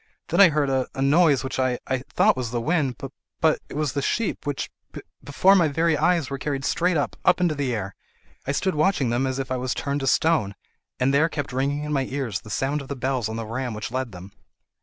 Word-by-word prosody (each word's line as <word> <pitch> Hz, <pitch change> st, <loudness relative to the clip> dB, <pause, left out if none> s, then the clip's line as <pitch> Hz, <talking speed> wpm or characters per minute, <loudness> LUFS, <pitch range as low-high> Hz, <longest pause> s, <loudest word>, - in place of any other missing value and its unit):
Then -, -, +4 dB
I 195 Hz, -, +9 dB
heard 150 Hz, -2 st, +1 dB
a—a 130 Hz, -1 st, -2 dB
noise, 145 Hz, -1 st, +4 dB
which 130 Hz, 0 st, -4 dB
I—I 130 Hz, 0 st, -1 dB
thought -, -, +3 dB
was 125 Hz, -3 st, -3 dB
the 120 Hz, 0 st, -2 dB
wind. 135 Hz, 0 st, 0 dB
But—but—it 145 Hz, +4 st, -3 dB
was 150 Hz, -3 st, -1 dB
the 140 Hz, -, -1 dB
sheep, 210 Hz, -2 st, -2 dB
which, 145 Hz, -, -3 dB, 0.2 s
be—before 185 Hz, +7 st, +1 dB
my 175 Hz, -5 st, +4 dB
very 160 Hz, +2 st, +1 dB
eyes, 170 Hz, -2 st, +2 dB
were 135 Hz, -, -3 dB
carried 140 Hz, -1 st, -3 dB
straight 175 Hz, 0 st, +1 dB
up—up 145 Hz, -, +1 dB
into 175 Hz, -3 st, +2 dB
the 140 Hz, -3 st, -2 dB
air. 100 Hz, -2 st, -4 dB, 0.5 s
I -, -, +1 dB
stood 185 Hz, +6 st, 0 dB
watching 150 Hz, -5 st, +1 dB
them 125 Hz, +3 st, +1 dB
as 130 Hz, 0 st, -2 dB
if 135 Hz, -1 st, -4 dB
I 130 Hz, -, 0 dB
was 125 Hz, 0 st, -2 dB
turned 140 Hz, 0 st, -2 dB
to 135 Hz, -, -3 dB
stone, 150 Hz, -14 st, +2 dB, 0.4 s
but 130 Hz, +2 st, +2 dB
there 150 Hz, +4 st, +3 dB
kept 145 Hz, -5 st, -4 dB
ringing 140 Hz, +3 st, -1 dB
in 150 Hz, 0 st, -3 dB
my 135 Hz, -2 st, +1 dB
ears 130 Hz, -8 st, -3 dB
the 105 Hz, -, -13 dB
sound 140 Hz, +6 st, -1 dB
of 140 Hz, -, -10 dB
the 140 Hz, -, -4 dB
bells 130 Hz, -3 st, -1 dB
on 110 Hz, -, -4 dB
the 115 Hz, 0 st, -4 dB
ram 120 Hz, +1 st, -4 dB
which 110 Hz, +1 st, -5 dB
led 130 Hz, -1 st, -3 dB
them." 90 Hz, +1 st, -11 dB
135 Hz, 225 wpm, -24 LUFS, 130-150 Hz, 0.5 s, I